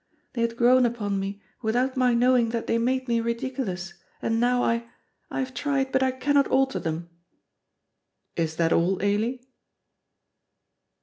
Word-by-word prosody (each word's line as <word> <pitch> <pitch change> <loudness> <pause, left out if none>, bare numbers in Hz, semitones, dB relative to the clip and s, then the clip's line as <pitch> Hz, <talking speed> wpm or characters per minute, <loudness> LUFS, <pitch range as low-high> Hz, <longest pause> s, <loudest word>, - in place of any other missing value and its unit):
They 240 - -2
had 230 0 -1
grown 250 +2 +5
upon 205 -4 -2
me 195 +1 -5 0.2
without 250 +4 0
my 250 -2 +3
knowing 245 -1 +3
that 230 0 -3
they 230 - +1
made 255 +2 0
me 235 -1 +1
ridiculous, 230 -6 -3 0.3
and 225 0 0
now 245 +1 +2
I 235 0 0 0.4
I - - -5
have 260 0 -4
tried, 270 +1 -1
but 265 - +2
I 260 - +3
cannot 280 +2 +2
alter 265 0 +1
them." 165 +1 -4 1.2
"Is 160 -2 -1
that 165 0 +2
all, 180 +3 +2
Ailie?" 225 +5 0
235 Hz, 150 wpm, -25 LUFS, 205-255 Hz, 1.2 s, grown